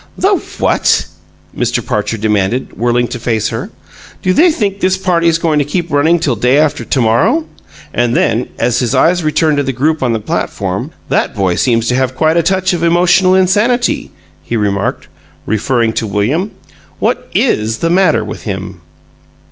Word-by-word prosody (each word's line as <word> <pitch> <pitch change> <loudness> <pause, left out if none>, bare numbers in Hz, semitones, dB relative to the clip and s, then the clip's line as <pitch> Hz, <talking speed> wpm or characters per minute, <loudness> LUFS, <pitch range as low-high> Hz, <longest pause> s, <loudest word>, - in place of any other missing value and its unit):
"The - - +2 0.3
what?" - - +2 0.5
Mr. - - -1
Parcher 115 - -2
demanded, 105 +2 -1
whirling 120 +1 +1
to 125 - -5
face 115 -2 -1
her. - - -5 0.5
"Do 185 - +2
they 340 - +5
think 200 -10 -1
this 190 0 +1
party's 170 -3 +1
going 160 -2 +1
to - - +2
keep 170 +4 -3
running 150 +4 +3
till 140 -6 0
day 125 +5 +2
after 155 -1 +1
to 130 - 0
morrow?" 195 - +2 0.5
And 120 0 +1
then, 115 +3 +1
as 120 +1 +1
his 120 -3 0
eyes 175 0 +3
returned 155 0 +1
to 145 - +1
the 135 - -1
group 150 +5 0
on 125 -2 +1
the 115 - -1
platform, 105 - -3 0.2
"That - - 0
boy 95 -2 +1
seems 115 +3 +1
to 125 - +1
have 130 0 0
quite 155 +4 +2
a 170 - +4
touch 185 +2 +1
of 175 - -2
emotional 175 +2 +3
insanity," 210 +6 +1 0.3
he 115 +8 -3
remarked, 100 -2 -1 0.4
referring 115 +2 0
to 110 - -2
William. 120 - 0 0.5
"What - - -1
IS 110 +1 +1
the 165 - -1
matter 180 -3 +3
with - - -7
him?" - - -6
145 Hz, 175 wpm, -14 LUFS, 115-175 Hz, 0.5 s, they